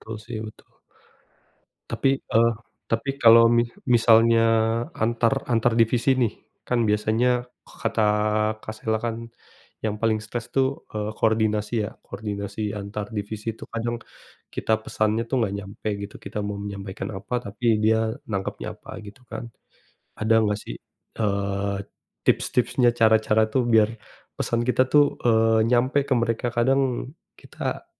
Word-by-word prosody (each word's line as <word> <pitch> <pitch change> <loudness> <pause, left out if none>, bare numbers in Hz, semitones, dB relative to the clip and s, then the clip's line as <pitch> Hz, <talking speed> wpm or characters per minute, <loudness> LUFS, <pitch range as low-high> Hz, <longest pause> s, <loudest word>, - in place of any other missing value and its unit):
Tul 110 0 -7
sih, 115 -1 -5
betul. 110 - -14 1.2
Tapi, 135 - +1
eee, 115 +1 +3 0.4
tapi 115 +4 0
kalau 115 -2 +8
mi 120 0 +4 0.3
misalnya 115 0 +5 0.5
antar 115 +3 +1
antar 115 0 +3
divisi 115 +3 +3
nih, 120 -4 +1 0.3
kan 125 - -1
biasanya 115 +4 +1 0.2
kata 115 -1 -2 0.6
Kak 110 - -6
Sela 110 0 -1
kan, 115 0 -3 0.6
yang 110 -1 -1
paling 110 -1 +2
stres 115 +2 -5
tuh, 135 0 -1
eee, 105 0 -2
koordinasi 110 -1 +1
ya, - - -5
koordinasi 100 0 -4
antar 105 0 -5
divisi 110 +1 -4
itu - - -12
kadang 120 +1 -3 0.5
kita 110 - 0
pesannya 110 +1 0
tuh - - 0
nggak 100 -3 0
nyampe 100 +2 -6
gitu. 100 - -9
Kita 100 +2 -6
mau 105 0 -4
menyampaikan 100 0 -6
apa, 95 - -8
tapi 105 +5 -6 0.2
dia 110 0 +2 0.2
nangkapnya 100 -2 -3
apa, - - -10
gitu 100 +4 -12
kan. 110 +1 -6 0.8
Ada 110 +1 +3
gak 105 0 0
sih, - - -7 0.4
eee, 100 -1 -1 0.5
tips-tipsnya, 125 0 +2
cara-cara 110 -1 +3
tuh 130 +4 +1
biar 110 -3 +4 0.5
pesan 115 - -1
kita 125 - +4
tuh, 145 -1 +7 0.2
eee, 115 -1 +4
nyampe 130 +3 +3
ke 135 - +3
mereka? 115 +1 -1
Kadang 130 +1 +1 0.3
kita, - - -5
110 Hz, 135 wpm, -24 LUFS, 105-120 Hz, 1.2 s, kalau